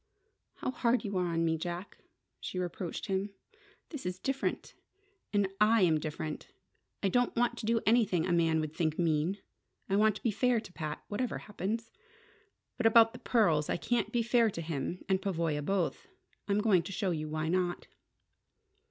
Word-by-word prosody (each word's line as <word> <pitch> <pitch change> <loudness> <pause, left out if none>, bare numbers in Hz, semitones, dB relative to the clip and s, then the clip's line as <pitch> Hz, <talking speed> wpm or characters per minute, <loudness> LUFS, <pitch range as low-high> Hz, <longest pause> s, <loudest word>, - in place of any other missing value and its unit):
"How - - -3
hard 245 -1 +1
you 200 -1 -3
are 180 -1 0
to - - -1
me, 165 -1 +1
Jack!" 175 +3 -5 0.4
she - - -5
reproached 180 -1 -4
him. 195 +1 -2 0.5
"This 295 -5 -7
is 180 0 -3
different. 270 +8 -2 0.6
And 205 -2 +2 0.2
I 230 -2 +5
am 160 -3 +4
different. 155 0 -5 0.6
I - - +4
don't 245 +5 +1
want 240 0 +2
to 215 - -5
do 230 0 +2
anything 215 -7 +3
a 185 - -1
man 165 -2 +3
would 155 -1 -4
think 155 -2 0
mean. 165 +2 +1 0.5
I 195 - +1
want 215 0 +4
to - - -10
be 230 - +2
fair 245 +3 +2
to 185 - -11
Pat, 155 -2 -5
whatever 245 +4 -2
happens. 215 +2 -4 0.9
But 245 -2 +3
about 225 0 +6
the - - -9
pearls 165 -11 +2
I - - +1
can't 240 +6 0
be 240 -1 +1
fair 235 -1 +3
to 170 - -5
him 160 +2 -4
and 190 -2 +1
Pavoya 165 -6 -1
both. 190 - -1 0.4
I'm 205 0 +2
going 205 -5 +4
to 195 - -8
show 195 -1 -1
you 155 -2 -3
why 155 +1 -2
not." 175 +1 0
190 Hz, 180 wpm, -31 LUFS, 165-225 Hz, 0.9 s, about